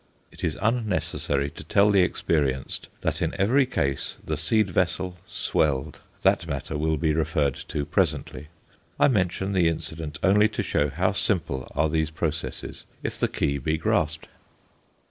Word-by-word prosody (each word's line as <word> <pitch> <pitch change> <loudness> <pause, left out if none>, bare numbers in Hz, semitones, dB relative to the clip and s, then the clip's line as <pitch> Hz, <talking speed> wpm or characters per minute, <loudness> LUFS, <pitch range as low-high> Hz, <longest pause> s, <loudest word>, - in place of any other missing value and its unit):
It - - -13
is - - 0
unnecessary 105 - 0
to - - -10
tell 100 +1 +4
the 100 -2 +5
experienced 70 -7 0
that - - -1
in - - -1
every 125 +7 +4
case 70 - -1
the - - -1
seed 110 -4 +2
vessel 90 +1 0
swelled; 70 -4 0 0.2
that 85 - +3
matter 70 0 -4
will 80 +1 +1
be 80 +1 +1
referred 75 -3 +1
to 75 -2 -2
presently. 75 0 -1 0.5
I - - +6
mention 95 -3 0
the 90 -3 +4
incident 80 -2 -4
only 105 +2 +5
to 105 - -2
show 75 0 +1
how 90 +7 +1
simple 90 -9 -1
are 80 - +3
these 80 0 0
processes 80 0 -4 0.2
if - - -4
the - - +2
key 70 0 -1
be 80 +4 0
grasped. 80 0 0
80 Hz, 155 wpm, -25 LUFS, 75-95 Hz, 0.5 s, I